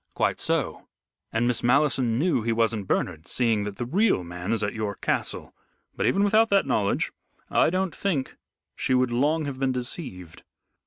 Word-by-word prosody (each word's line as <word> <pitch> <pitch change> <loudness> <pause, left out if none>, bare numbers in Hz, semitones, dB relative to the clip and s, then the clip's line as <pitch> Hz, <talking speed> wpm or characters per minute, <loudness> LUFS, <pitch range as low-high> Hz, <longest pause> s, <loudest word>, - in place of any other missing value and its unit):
"Quite - - +1
so. - - -1 0.4
And 115 +2 +1
Miss 125 - 0
Malleson 130 -2 +2
knew 145 -3 +2
he 115 +1 -1
wasn't 115 -3 0
Bernard, 85 -3 -1
seeing 115 -4 +1
that 105 -1 -5
the 120 - -4
real 185 - +2
man 90 +3 -5
is 115 -2 0
at 105 - -1
your 105 -2 -3
castle. - - -2 0.4
But - - 0
even 200 - +3
without 220 +2 +4
that 200 -4 +3
knowledge 105 -7 0 0.4
I - - +4
don't 185 -1 -1
think 160 -10 -2 0.4
she 130 - +1
would 125 -1 +2
long 150 +6 +1
have 135 -2 -5
been 135 -1 +1
deceived. 120 - -6
125 Hz, 175 wpm, -26 LUFS, 110-150 Hz, 0.4 s, without